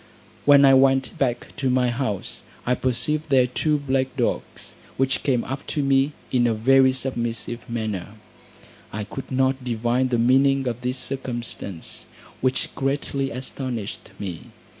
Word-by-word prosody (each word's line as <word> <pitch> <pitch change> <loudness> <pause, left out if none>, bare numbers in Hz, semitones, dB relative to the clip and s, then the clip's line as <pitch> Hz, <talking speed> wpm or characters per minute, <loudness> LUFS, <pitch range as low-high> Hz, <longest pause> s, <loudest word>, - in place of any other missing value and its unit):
When 140 -1 +8
I 135 - +7
went 135 0 +4
back 125 -3 -1
to 135 - 0
my 125 -1 +3
house, 120 -6 -3 0.2
I 125 - +2
perceived 130 +5 -1
there 130 -2 +5
two 150 +5 0
black 130 -2 -1
dogs, 120 - -2 0.2
which 135 0 +1
came 125 -4 +1
up 135 +2 -6
to 145 - -1
me 135 +1 +3 0.2
in 120 -2 +3
a 115 - +1
very 130 +4 +5
submissive 120 -2 -3
manner: 110 -4 -3 0.8
I 105 +1 -3
could 135 +7 -8
not 130 0 +1
divine 120 +1 +1
the 125 -2 +1
meaning 135 +3 +3
of 120 0 -3
this 125 +1 -2
circumstance, 120 -9 -4 0.3
which 130 0 0
greatly 135 0 -1
astonished 125 -3 -5
me. 90 -5 -6
130 Hz, 145 wpm, -24 LUFS, 120-135 Hz, 0.8 s, When